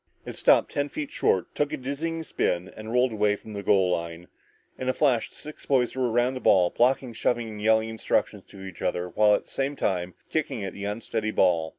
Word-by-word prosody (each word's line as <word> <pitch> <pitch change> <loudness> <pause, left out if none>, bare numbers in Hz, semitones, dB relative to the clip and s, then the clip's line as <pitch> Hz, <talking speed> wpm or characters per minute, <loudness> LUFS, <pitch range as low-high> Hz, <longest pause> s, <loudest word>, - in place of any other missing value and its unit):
It - - -7
stopped - - +4
ten 145 0 -1
feet 145 -1 -5
short, 95 - 0
took 150 0 0
a - - -2
dizzying 160 +5 -3
spin 90 - -1
and 110 +1 -8
rolled 125 +1 +3
away 105 -1 +2
from 110 +1 -11
the 100 - -4
goal 95 -2 +3
line. 85 0 -4 0.5
In 130 - -2
a 130 - 0
flash, 130 -6 +2
the - - -16
six 150 +1 -10
boys 130 -3 +2
were 130 -2 0
around 120 +3 +2
the 130 - -5
ball, 90 -7 +4
blocking, 125 0 +1
shoving, 120 +1 0
and 105 -1 -8
yelling 110 +1 +3
instructions 110 0 -1
to 95 - -12
each 95 -3 -10
other 90 0 -1
while 105 +3 +4
at - - -3
the - - -17
same 140 +1 -2
time 90 -7 -2 0.2
kicking 145 -8 -2
at 95 - -5
the 100 - -6
unsteady 110 +1 -2
ball. 85 -6 +2
110 Hz, 225 wpm, -26 LUFS, 95-130 Hz, 0.5 s, stopped